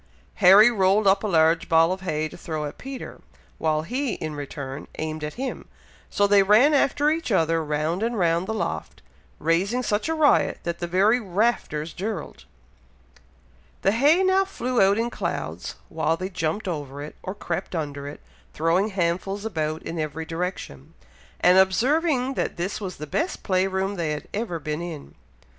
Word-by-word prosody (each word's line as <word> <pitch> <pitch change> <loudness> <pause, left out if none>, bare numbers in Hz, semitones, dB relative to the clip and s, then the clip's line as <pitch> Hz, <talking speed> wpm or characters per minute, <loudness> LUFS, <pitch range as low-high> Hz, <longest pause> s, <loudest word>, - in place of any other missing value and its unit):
Harry 205 +4 +8
rolled 200 0 +3
up 195 +1 +4
a - - 0
large 165 -2 +3
ball 165 +1 +5
of 185 0 -3
hay 155 -4 -1
to - - -12
throw 155 -3 -4
at 145 - -8
Peter, 265 0 -8 0.4
while 155 -1 +1
he, 250 - -2
in 155 -1 -5
return, 140 -1 -6
aimed 155 0 -4
at 150 - -5
him, 265 +2 -5 0.4
so 205 - +2
they 200 0 +5
ran 215 +10 +5
after 290 +1 +3
each 320 -5 -2
other, 165 -3 +2
round 155 +4 -1
and 230 +1 -1
round 170 0 +1
the - - -2
loft, - - -4 0.3
raising 195 +10 +1
such 210 +6 -1
a 320 - 0
riot, 305 -2 +3
that 170 0 -3
the 175 - -3
very 200 +7 +3
"rafters 190 -7 -1
dirled." 195 -4 -5 1.4
The 195 - +4
hay 290 - +4
now 380 +1 +4
flew 255 -10 -2
about 195 +1 +4
in 235 +1 -1
clouds, - - -4
while 160 0 0
they 185 +2 -4
jumped 170 +3 -2
over 145 -4 -5
it, 150 - -9
or 185 - -5
crept 190 -2 -4
under 145 -3 -4
it, 145 - -9 0.3
throwing 170 +5 +2
handfuls 195 +1 -2
about 155 -6 -2
in 165 - -5
every 155 +1 -3
direction, 165 - -5 0.5
and 180 +1 +6
observing 260 - +2
that - - -2
this 185 +5 -3
was 185 -3 -5
the 150 - -7
best 325 - -2
play 185 0 +1
room 190 +1 -2
they 160 -3 -1
had 150 - -6
ever 205 -5 -2
been 155 0 -4
in. 165 -4 -7
185 Hz, 175 wpm, -24 LUFS, 160-220 Hz, 1.4 s, Harry